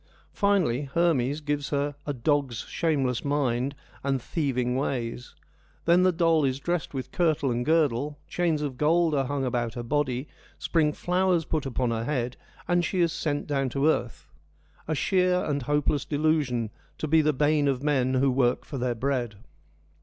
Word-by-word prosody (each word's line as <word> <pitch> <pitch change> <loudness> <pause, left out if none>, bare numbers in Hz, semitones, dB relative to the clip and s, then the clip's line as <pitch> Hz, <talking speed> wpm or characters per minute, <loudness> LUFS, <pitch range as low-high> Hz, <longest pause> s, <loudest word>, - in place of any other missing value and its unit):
Finally, 180 -10 +1
Hermes 155 -4 +2
gives 145 -1 -2
her 145 0 -1
' - - -27
a 145 - 0
dog's 135 -1 0
shameless 135 -7 -1
mind 140 -2 0 0.3
and 135 -1 0
thieving 125 -3 -1
ways.' 125 -3 -3 0.5
Then 170 +2 +5
the 185 0 +4
doll 165 -2 +2
is 135 -1 0
diessed 175 -1 -2
with 130 - -5
kirtle 155 -6 +1
and 120 +1 -1
girdle, 150 -2 +1
chains 165 -4 0
of 135 -4 -4
gold 165 +1 +3
are 135 -2 +1
hung 135 0 -2
about 120 -2 -1
her 120 - -4
body, 135 +1 -1 0.3
spring 155 -3 +1
flowers 180 0 +1
put 155 -4 -2
upon 125 -1 -1
her 115 0 -2
head, 125 -3 -2 0.3
and 175 0 +2
she 185 - -1
is 170 -2 +2
sent 145 -4 -2
down 135 -3 0
to 140 +3 +1
earth. 125 -6 -1 0.3
' - - -32
A 155 - 0
sheer 180 +4 +2
and 145 -1 -1
hopeless 145 +1 0
delusion, 145 -7 0 0.3
to 155 - -3
be 160 +2 +5
the 155 0 +3
bane 150 +1 +2
of 135 -1 0
men 130 -3 +1
who 135 +1 +3
work 125 -1 +1
for 140 - -5
their 120 -1 -1
bread.' 120 -3 -1
145 Hz, 175 wpm, -27 LUFS, 125-155 Hz, 0.5 s, Then